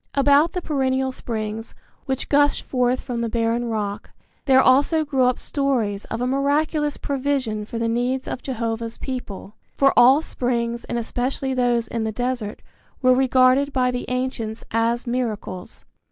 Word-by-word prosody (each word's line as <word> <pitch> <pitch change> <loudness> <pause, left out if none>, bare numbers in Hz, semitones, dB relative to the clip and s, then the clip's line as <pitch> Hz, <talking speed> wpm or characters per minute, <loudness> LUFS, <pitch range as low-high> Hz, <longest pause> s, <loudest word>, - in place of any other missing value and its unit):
About 285 +3 +4
the 360 - -3
perennial 265 -2 0
springs, 225 -2 -5 0.3
which 265 -1 -2
gush 290 0 +3
forth 250 0 0
from 240 -3 -4
the 230 - -1
barren 230 +1 0
rock, 210 -2 -3 0.4
there 265 -2 +5
also 285 +5 +4
grew 265 -3 +2
up 250 0 +2
stories 240 -8 -1
of 225 - -5
a - - +1
miraculous 290 +3 0
provision 265 -6 -2
for 230 - -6
the 230 0 0
needs 245 +3 -1
of 255 - -4
Jehovah's 230 -2 -3
people; 230 -7 -6 0.2
for 275 0 +4
all 260 +5 +6
springs 235 -3 -2
and 240 - -3
especially 255 +3 -2
those 240 -2 +1
in 230 0 -3
the 220 - -1
desert 245 -2 -3 0.4
were 255 0 +6
regarded 260 +2 +3
by 255 -2 +1
the 250 0 -4
ancients 250 -3 -3
as 230 +2 0
miracles. 220 -7 -4
250 Hz, 155 wpm, -22 LUFS, 230-265 Hz, 0.4 s, all